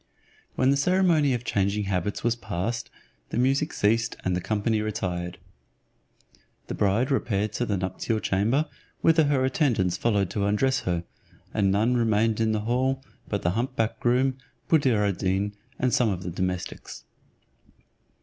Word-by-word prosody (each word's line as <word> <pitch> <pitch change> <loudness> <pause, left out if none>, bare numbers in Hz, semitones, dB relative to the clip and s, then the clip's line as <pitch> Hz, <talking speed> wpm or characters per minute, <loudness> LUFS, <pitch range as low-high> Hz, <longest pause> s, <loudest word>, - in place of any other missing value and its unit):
When 130 +1 +3
the 140 - +3
ceremony 170 -2 +3
of 120 - -5
changing 100 -2 0
habits 95 0 -2
was 120 0 +2
passed, 115 +1 -3 0.4
the - - -3
music 135 +5 +2
ceased 115 +3 +1
and 90 -1 +1
the 90 - -2
company 110 +2 0
retired. 90 -5 -3 1.3
The - - -5
bride 105 +7 +1
repaired 105 -4 0
to 120 - -1
the 100 - 0
nuptial 95 +4 -2
chamber, 110 +10 +1 0.3
whither 160 -1 +5
her 140 -2 +2
attendants 125 - +1
followed 100 -5 +1
to 100 -1 0
undress 130 +6 +2
her, 85 -1 0 0.5
and 100 -2 +2
none 110 +5 +2
remained 115 -1 +2
in 110 -1 +2
the 110 -1 0
hall 130 +4 0 0.2
but 100 - -2
the 85 - +2
hump 120 +6 -2
back 115 -2 -1
groom, 130 +2 +2 0.3
Buddir 125 -10 +3
ad 100 -3 -2
Deen, 100 +2 0 0.2
and 125 -2 0
some 120 -3 +3
of 90 -3 -3
the 90 - -4
domestics. 90 0 -4
110 Hz, 160 wpm, -26 LUFS, 100-130 Hz, 1.3 s, whither